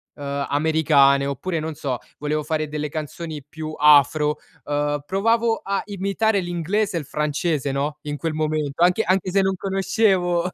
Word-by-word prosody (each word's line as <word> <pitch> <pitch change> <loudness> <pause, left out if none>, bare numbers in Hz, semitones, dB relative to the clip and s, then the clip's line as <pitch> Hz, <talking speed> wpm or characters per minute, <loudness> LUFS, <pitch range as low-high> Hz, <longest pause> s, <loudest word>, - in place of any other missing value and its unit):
americane 140 0 +2
oppure, 155 +5 -2
non 160 0 -4
so, 140 -4 -3 0.2
volevo 150 +1 -1
fare 155 -1 -1
delle 150 0 -4
canzoni 155 0 -6
più 155 +1 -7
afro, 150 0 +5 0.3
uhm, 145 0 -1
provavo 225 +5 +1
a 200 0 -1
imitare 200 +2 0
l'inglese 175 +3 -1
e - - 0
il 145 - -8
francese, 150 -1 -1
no. 145 +2 -2
In 145 0 -5
quel 165 0 -3
momento, 155 0 -1
anche 180 +5 +3
anche 185 0 +1
se 195 +1 +3
non 190 0 +1
conoscevo 190 -2 +1
155 Hz, 155 wpm, -22 LUFS, 145-185 Hz, 0.3 s, afro